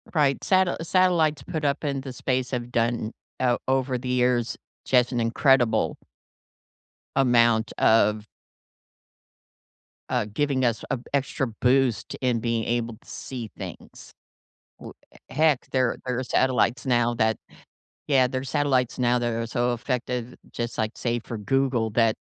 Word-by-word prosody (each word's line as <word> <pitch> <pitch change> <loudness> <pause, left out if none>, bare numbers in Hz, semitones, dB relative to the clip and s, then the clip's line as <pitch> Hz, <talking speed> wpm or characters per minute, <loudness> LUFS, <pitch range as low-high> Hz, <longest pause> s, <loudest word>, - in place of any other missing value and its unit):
Right. 140 -3 +2
Sate 190 -1 +3
Satellites 170 -3 +2
put 155 -2 -4
up 140 +1 0
in 140 -2 -1
the 135 -1 -7
space 130 0 -1
have 120 -1 -3
done 115 -2 0 0.3
o 125 -2 +2
over 130 -1 +1
the 125 - -5
years 125 -2 +1 0.3
just 125 -1 +3
an 120 - -1
incredible 120 +1 +2 1.2
amount 120 -3 +3
of 110 -1 +3 1.8
uh, 125 -4 0
giving 140 -1 +1
us 115 -2 0
a 130 - 0
extra 135 -1 0
boost 125 -3 +2
in 125 -3 +1
being 115 0 -1
able 120 -1 -1
to - - -26
see 120 -4 -7
things. - - -10 0.7
W - - -10 0.4
heck, 155 -4 +2
there 130 -3 +1
there 125 -1 -1
are - - -2
satellites 125 -2 +1
now 120 -2 +2
that 110 -1 +1 0.7
yeah, 135 -3 +4
there 130 +1 -3
are - - -7
satellites 130 -2 0
now 125 0 +2
that 120 -1 -1
are 115 0 -2
so 120 +1 0
effective, 125 0 -3 0.2
just 120 0 -4
like, 110 0 0
say, 120 0 -1
for 115 0 -7
Google, 125 +1 0
that 115 0 +3
125 Hz, 145 wpm, -25 LUFS, 115-135 Hz, 1.8 s, yeah